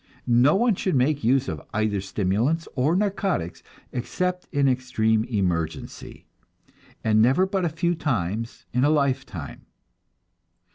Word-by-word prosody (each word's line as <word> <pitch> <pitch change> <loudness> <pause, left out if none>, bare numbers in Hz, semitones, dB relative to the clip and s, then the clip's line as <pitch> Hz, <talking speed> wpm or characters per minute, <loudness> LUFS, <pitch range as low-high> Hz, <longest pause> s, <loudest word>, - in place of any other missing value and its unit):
No 120 +4 +4
one 235 +3 +3
should 185 -3 -1
make 140 +2 +1
use 130 +3 +2
of 75 - -4
either 110 -2 0
stimulants 105 - 0
or 140 +6 +2
narcotics 195 - -1 0.3
except 180 +8 -2
in 140 -2 +2
extreme 125 -4 +1
emergency, 90 -9 -3 0.8
and 110 0 +3
never 130 +11 +4
but 190 -2 -1
a - - +1
few 170 +2 0
times 115 - -3
in 125 +1 +2
a 145 - +4
lifetime. 135 - -2
130 Hz, 130 wpm, -24 LUFS, 110-165 Hz, 0.8 s, No